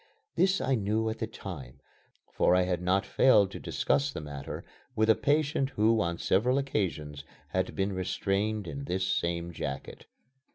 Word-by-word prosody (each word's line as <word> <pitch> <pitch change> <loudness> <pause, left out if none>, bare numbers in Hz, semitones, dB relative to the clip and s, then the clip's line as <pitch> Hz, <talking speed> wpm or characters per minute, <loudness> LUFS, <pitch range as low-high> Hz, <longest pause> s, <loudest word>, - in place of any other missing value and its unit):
This 190 +1 +3
I 135 - 0
knew 110 0 0
at 110 - -7
the 110 - -2
time, 80 - -8 0.5
for 90 - +4
I 90 - +4
had 90 -1 -1
not 95 +2 +2
failed 105 -7 +4
to - - -7
discuss 145 0 0
the - - -5
matter 70 -2 -7 0.3
with 110 0 +4
a - - +4
patient 145 -2 +1
who 110 +1 +4
on 85 0 -1
several 125 +11 +2
occasions 80 - -2 0.3
had 95 0 -1
been 95 0 0
restrained 100 +2 -1
in 140 +9 -5
this 95 -5 -1
same 85 -1 -1
jacket. 70 -4 -6
100 Hz, 165 wpm, -29 LUFS, 85-115 Hz, 0.5 s, for